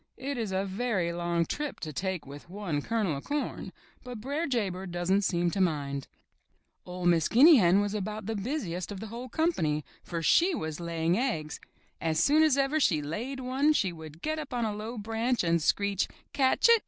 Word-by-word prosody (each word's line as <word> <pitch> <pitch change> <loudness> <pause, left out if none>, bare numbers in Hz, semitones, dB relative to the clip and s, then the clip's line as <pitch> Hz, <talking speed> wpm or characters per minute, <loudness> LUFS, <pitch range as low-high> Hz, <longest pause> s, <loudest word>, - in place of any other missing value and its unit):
It 280 +2 -4
is 225 -5 -3
a 190 +1 0
very 195 -4 -1
long 170 -1 0
trip 295 - -4
to 155 -2 -5
take 185 +1 -3
with 145 +4 -11
one 180 -6 -3
kernel 210 -6 -1
of 140 - -8
corn, 290 0 -3 0.3
but 250 -3 -7
Br'er 285 +8 -2
Jay 235 -7 +1
Bird 185 0 -6
doesn't 175 +3 +1
seem 175 -3 +1
to 195 - -1
mind. 140 -6 -1 0.8
or 180 0 -6
Miss 170 -3 +4
Guinea 290 +6 +8
Hen 190 -1 +5
was 205 0 -1
about 210 0 -4
the 225 +2 -2
busiest 200 - -3
of 200 - -6
the 220 - -6
whole 245 +2 -6
company, 165 - 0 0.2
for 170 -2 -5
she 345 - +4
was 155 - -4
laying 170 +2 0
eggs. 160 - -2 0.4
As 160 -1 0
soon 300 +2 +4
as 310 -4 +4
ever 275 +3 +2
she 200 - +4
had 150 - -4
laid 240 - -4
one 265 +4 +2
she 190 -11 +1
would 160 0 -11
get 310 0 -1
up 295 -5 -6
on 240 -2 0
a 215 - -1
low 220 +3 -6
branch 225 +3 0
and 170 -1 +2
screech, 200 +4 +1 0.3
"Catch 270 - +3
it! 465 -1 +7
200 Hz, 205 wpm, -29 LUFS, 170-255 Hz, 0.8 s, Guinea